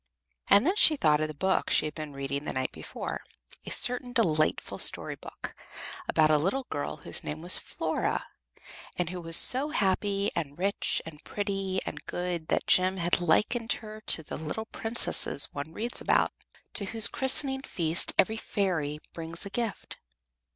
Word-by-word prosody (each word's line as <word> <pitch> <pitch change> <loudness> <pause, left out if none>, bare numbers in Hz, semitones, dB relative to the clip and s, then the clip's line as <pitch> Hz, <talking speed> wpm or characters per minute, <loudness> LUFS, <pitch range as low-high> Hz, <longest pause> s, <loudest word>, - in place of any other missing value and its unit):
And 200 +5 +6
then 370 +5 +2
she 315 - +6
thought 150 - +2
of 155 - 0
the 155 - -9
book 190 +5 0
she - - +3
had 150 - -4
been 155 -1 -7
reading 140 +1 -4
the - - -4
night 130 0 -2
before - - -6 0.5
a - - -3
certain 245 0 +1
delightful 155 -10 0
story - - +4
book, - - -10 0.6
about 155 -1 +3
a 150 - +4
little 225 - -1
girl 145 - -4
whose - - -3
name 155 +2 -6
was 175 - +5
Flora, - - -3 0.7
and 180 -1 -2
who 180 -1 -6
was 165 0 +5
so 270 +4 +6
happy 200 -5 0
and 145 -4 -4
rich 195 +3 -1
and 155 -1 -11
pretty 195 -2 -3
and - - -6
good 175 -3 -4
that - - 0
Jem 185 +1 +3
had 175 0 0
likened 220 +8 +1
her 215 -1 -10
to 160 - +2
the - - -6
little 160 +8 -5
princesses 225 -11 +2
one 145 +2 -6
reads 230 +8 -4
about, - - +2 0.4
to 200 - +2
whose 225 +2 +4
christening 265 0 +3
feast 170 -9 -1
every 220 +3 +2
fairy 175 -10 -2 0.2
brings 165 +2 -6
a 200 - -8
gift. 230 -2 -5
185 Hz, 170 wpm, -28 LUFS, 155-220 Hz, 0.7 s, And